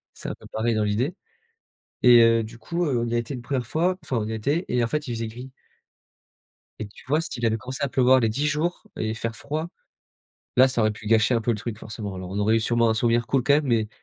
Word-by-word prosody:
c'est -, -, -6 dB
un -, -, -5 dB
peu -, -, -13 dB
pareil 115 Hz, +1 st, 0 dB
dans 110 Hz, -, +1 dB
l'idée. 115 Hz, -, 0 dB, 0.9 s
Et 120 Hz, -1 st, +8 dB
heu, 115 Hz, 0 st, +4 dB
du 110 Hz, +2 st, -11 dB
coup, 170 Hz, +7 st, -2 dB
heu, 135 Hz, -5 st, +1 dB
on 120 Hz, -, -1 dB
y 115 Hz, -, -2 dB
a 120 Hz, -, +2 dB
été 120 Hz, +4 st, -4 dB
une 125 Hz, -, -6 dB
1re 125 Hz, -1 st, -2 dB
fois, 175 Hz, +7 st, 0 dB
enfin, 130 Hz, -, -3 dB
on 105 Hz, -, -2 dB
y -, -, -4 dB
était 140 Hz, -, -1 dB
et 125 Hz, 0 st, +1 dB
en -, -, -1 dB
fait, 150 Hz, +3 st, -2 dB
il 120 Hz, -, -2 dB
faisait 115 Hz, -1 st, -3 dB
gris. 125 Hz, +4 st, -9 dB, 1.3 s
Et 105 Hz, -, -4 dB
tu 100 Hz, -, -17 dB
vois, 150 Hz, +4 st, +2 dB
s'il 130 Hz, -7 st, -4 dB
avait 110 Hz, 0 st, +2 dB
commencé 130 Hz, +4 st, -6 dB
à -, -, -1 dB
pleuvoir 130 Hz, 0 st, +4 dB
les 115 Hz, -, +2 dB
10 140 Hz, +7 st, -1 dB
jours 155 Hz, +4 st, -1 dB
et 110 Hz, 0 st, -2 dB
faire 115 Hz, 0 st, -4 dB
froid, 155 Hz, +7 st, -4 dB, 0.9 s
là 130 Hz, +1 st, +7 dB
ça 125 Hz, -2 st, -1 dB
aurait 110 Hz, -1 st, +3 dB
pu 105 Hz, 0 st, -10 dB
gâcher 115 Hz, +2 st, +3 dB
un 115 Hz, -, +2 dB
peu 120 Hz, -, -1 dB
le 115 Hz, -, +1 dB
truc 115 Hz, 0 st, -5 dB
forcément. 105 Hz, -3 st, -7 dB
Alors 90 Hz, -1 st, -7 dB
on 100 Hz, -, -3 dB
aurait 110 Hz, +2 st, +3 dB
eu -, -, +2 dB
sûrement 115 Hz, +1 st, +2 dB
un 110 Hz, -, +2 dB
souvenir 115 Hz, +1 st, +1 dB
cool 135 Hz, +1 st, +1 dB
quand 140 Hz, +3 st, +4 dB
même, 150 Hz, 0 st, +1 dB
mais 115 Hz, -4 st, +1 dB
120 Hz, 270 wpm, -24 LUFS, 110-135 Hz, 1.3 s, Et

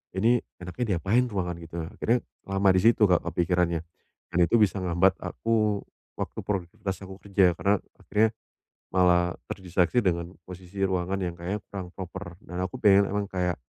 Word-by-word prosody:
"Ini, 115 Hz, +6 st, +4 dB, 0.2 s
enaknya 90 Hz, +8 st, -3 dB
diapain 105 Hz, +9 st, +2 dB
ruangan?" 95 Hz, -6 st, -2 dB
Gitu. 80 Hz, -1 st, -12 dB, 0.2 s
Akhirnya, 115 Hz, +3 st, +1 dB, 0.3 s
lama 95 Hz, 0 st, +2 dB
di 95 Hz, -, +3 dB
situ, 115 Hz, 0 st, +5 dB
Kak, 90 Hz, -2 st, +4 dB
kepikirannya 85 Hz, 0 st, +1 dB, 0.5 s
dan -, -, -2 dB
itu 85 Hz, -, +1 dB
bisa 105 Hz, -1 st, +3 dB
ngehambat 90 Hz, +1 st, +2 dB
aku 110 Hz, -3 st, 0 dB, 0.3 s
waktu -, -, -5 dB
produktivitas 95 Hz, 0 st, -3 dB
aku 95 Hz, 0 st, -9 dB
kerja, 95 Hz, -1 st, +3 dB
karena, 100 Hz, 0 st, +2 dB, 0.2 s
akhirnya 110 Hz, +2 st, +2 dB, 0.6 s
malah 90 Hz, -1 st, +4 dB, 0.2 s
terdistraksi 90 Hz, +5 st, +1 dB
dengan 85 Hz, -1 st, -1 dB
posisi 95 Hz, +2 st, -7 dB
ruangan 95 Hz, 0 st, 0 dB
yang 90 Hz, -2 st, -2 dB
kayaknya 95 Hz, +4 st, -3 dB
kurang 95 Hz, -3 st, -5 dB
proper, 90 Hz, -2 st, -7 dB
dan, 90 Hz, +1 st, -7 dB
aku 100 Hz, -, -5 dB
pengen 100 Hz, -1 st, +6 dB
emang 105 Hz, +1 st, -1 dB
kayak, 90 Hz, -2 st, 0 dB
95 Hz, 160 wpm, -27 LUFS, 90-100 Hz, 0.6 s, pengen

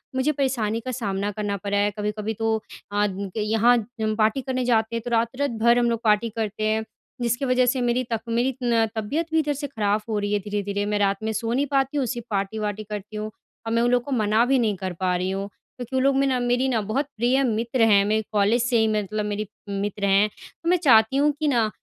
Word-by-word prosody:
मुझे 260 Hz, +3 st, +2 dB
परेशानी 250 Hz, -6 st, -1 dB
का 255 Hz, -, -2 dB
सामना 205 Hz, -4 st, -2 dB
करना 205 Hz, -1 st, -3 dB
पड़ा 200 Hz, +1 st, -2 dB
है। 205 Hz, +1 st, +2 dB
कभी-कभी 210 Hz, +1 st, -2 dB
तो 225 Hz, 0 st, +1 dB, 0.4 s
अ, 205 Hz, 0 st, +2 dB, 0.3 s
यहाँ 220 Hz, +3 st, +3 dB, 0.3 s
हम 215 Hz, 0 st, 0 dB
पार्टी 220 Hz, +4 st, +2 dB
करने 255 Hz, -1 st, -2 dB
जाते 230 Hz, -1 st, +1 dB
हैं, 230 Hz, -, -2 dB
तो -, -, -3 dB
रात-रात 235 Hz, +5 st, 0 dB
भर 235 Hz, +1 st, +5 dB
हम 240 Hz, 0 st, +2 dB
लोग 230 Hz, -1 st, -1 dB
पार्टी 215 Hz, +1 st, +3 dB
करते 215 Hz, -1 st, -3 dB
हैं। 220 Hz, 0 st, +1 dB, 0.4 s
जिसकी 240 Hz, +3 st, 0 dB
वजह 255 Hz, -1 st, +3 dB
से 250 Hz, +1 st, +1 dB
मेरी 245 Hz, +1 st, +1 dB
तक 225 Hz, -, -1 dB
मेरी 240 Hz, +3 st, +1 dB
न 230 Hz, -2 st, +3 dB
तबियत 250 Hz, +10 st, -1 dB
भी 320 Hz, -, +3 dB
इधर 295 Hz, -2 st, 0 dB
से 285 Hz, +1 st, -4 dB
ख़राब 210 Hz, -4 st, -1 dB
हो 215 Hz, -, 0 dB
रही 205 Hz, 0 st, -2 dB
है, 205 Hz, -, +2 dB
धीरे-धीरे। 205 Hz, 0 st, -2 dB
मैं 210 Hz, 0 st, 0 dB
रात 200 Hz, +1 st, +1 dB
में 220 Hz, -, -1 dB
सो 230 Hz, +2 st, -2 dB
नहीं 275 Hz, +3 st, +1 dB
पाती 275 Hz, +1 st, +1 dB
हूँ, 280 Hz, -, +2 dB
उसी 245 Hz, 0 st, -3 dB
पार्टी 200 Hz, +1 st, -2 dB
वार्टी 210 Hz, 0 st, -3 dB
करती 210 Hz, 0 st, -7 dB
हूँ। 215 Hz, 0 st, -4 dB, 0.4 s
और 225 Hz, -, -2 dB
मैं 230 Hz, -, +3 dB
उन 240 Hz, +1 st, +2 dB
लोगों 245 Hz, -1 st, +2 dB
को 285 Hz, -, -6 dB
मना 215 Hz, +2 st, +3 dB
भी 265 Hz, +1 st, +3 dB
नहीं 215 Hz, -4 st, +1 dB
कर 185 Hz, -1 st, -4 dB
पा 185 Hz, -1 st, +1 dB
रही 180 Hz, +1 st, -1 dB
हूँ, 195 Hz, +1 st, -3 dB
क्योंकि 245 Hz, +5 st, -10 dB
वो -, -, +3 dB
लोग 275 Hz, +1 st, +3 dB
में 275 Hz, -, +3 dB
ना 260 Hz, -2 st, +1 dB
मेरी 245 Hz, +2 st, +1 dB
ना 230 Hz, -4 st, +1 dB
बहुत 220 Hz, +8 st, -1 dB
प्रिय 250 Hz, +4 st, +2 dB
मित्र 235 Hz, +1 st, 0 dB
हैं, 205 Hz, -3 st, +6 dB
मेरे 215 Hz, +1 st, +1 dB
कॉलेज 210 Hz, +3 st, +2 dB
से 240 Hz, 0 st, +2 dB
ही, 220 Hz, -, +3 dB
मैं 215 Hz, -1 st, 0 dB
मतलब 210 Hz, +2 st, -3 dB
मेरी 210 Hz, 0 st, -3 dB, 0.2 s
मित्र 200 Hz, 0 st, -2 dB
हैं। 200 Hz, +2 st, +4 dB, 0.3 s
तो 335 Hz, -, 0 dB
मैं 360 Hz, -, +4 dB
चाहती 250 Hz, -6 st, +4 dB
हूँ 295 Hz, +2 st, +4 dB
कि 310 Hz, -, 0 dB
ना, 235 Hz, -6 st, +2 dB
225 Hz, 245 wpm, -24 LUFS, 210-250 Hz, 0.4 s, हैं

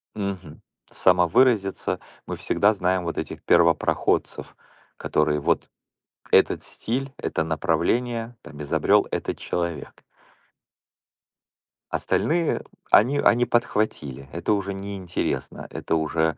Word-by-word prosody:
Мгм. 95 Hz, -6 st, -5 dB, 0.3 s
Самовыразиться. 95 Hz, +3 st, +2 dB, 0.3 s
Мы -, -, -4 dB
всегда 105 Hz, +2 st, +2 dB
знаем 95 Hz, -1 st, 0 dB
вот 85 Hz, -1 st, -4 dB
этих -, -, -5 dB
первопроходцев, 85 Hz, -1 st, +2 dB, 0.4 s
которые 75 Hz, -1 st, +1 dB
вот -, -, 0 dB, 0.6 s
этот -, -, +4 dB
стиль, 135 Hz, +4 st, -4 dB
это -, -, -2 dB
направление, 115 Hz, +9 st, -1 dB
там 75 Hz, 0 st, -11 dB
изобрёл 70 Hz, -, +2 dB
этот -, -, -3 dB
человек. 85 Hz, -2 st, -4 dB, 1.9 s
Остальные 165 Hz, 0 st, 0 dB, 0.3 s
они 130 Hz, +7 st, +5 dB
они 120 Hz, -3 st, +4 dB
подхватили. 80 Hz, -, -1 dB
Это 85 Hz, +5 st, 0 dB
уже 100 Hz, -1 st, -2 dB
неинтересно. 95 Hz, -2 st, -4 dB
Это 80 Hz, -, -2 dB
уже 80 Hz, 0 st, 0 dB
95 Hz, 100 wpm, -24 LUFS, 80-115 Hz, 1.9 s, они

